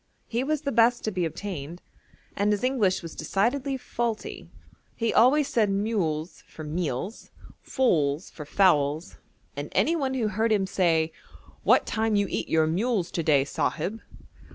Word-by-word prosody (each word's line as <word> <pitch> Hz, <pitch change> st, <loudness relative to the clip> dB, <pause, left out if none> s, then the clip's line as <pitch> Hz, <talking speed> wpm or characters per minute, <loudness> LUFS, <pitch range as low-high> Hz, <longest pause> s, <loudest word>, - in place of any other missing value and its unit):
He 235 Hz, +2 st, -2 dB
was 305 Hz, +1 st, -1 dB
the 280 Hz, -2 st, -2 dB
best 235 Hz, +1 st, +3 dB
to 215 Hz, -, -1 dB
be 180 Hz, -3 st, -1 dB
obtained, 170 Hz, -2 st, -6 dB, 0.6 s
and 205 Hz, +1 st, +1 dB
his 205 Hz, +1 st, -1 dB
English 225 Hz, -9 st, +1 dB
was 165 Hz, -, -7 dB
decidedly 250 Hz, -, 0 dB
faulty. 235 Hz, -3 st, -4 dB, 0.5 s
He 230 Hz, -1 st, -1 dB
always 275 Hz, +5 st, +5 dB
said 220 Hz, -6 st, +2 dB
mules 195 Hz, -6 st, -1 dB
for 155 Hz, -, -10 dB
meals, 160 Hz, -, -4 dB, 0.3 s
foals 160 Hz, -, 0 dB
for 150 Hz, -, -8 dB
fowls, 155 Hz, -1 st, +2 dB, 0.4 s
and -, -, -5 dB
any 335 Hz, -, +2 dB
one 270 Hz, -4 st, -1 dB
who 225 Hz, -4 st, 0 dB
heard 220 Hz, +3 st, 0 dB
him 200 Hz, -3 st, +2 dB
say 165 Hz, -4 st, +1 dB, 0.5 s
'What -, -, +4 dB
time 220 Hz, -1 st, 0 dB
you 205 Hz, 0 st, +3 dB
eat -, -, -2 dB
your 160 Hz, -1 st, +3 dB
mules 185 Hz, +2 st, 0 dB
to 170 Hz, -, -1 dB
day, 145 Hz, -4 st, +3 dB
Sahib?' 175 Hz, +8 st, -2 dB
200 Hz, 155 wpm, -26 LUFS, 160-235 Hz, 0.6 s, always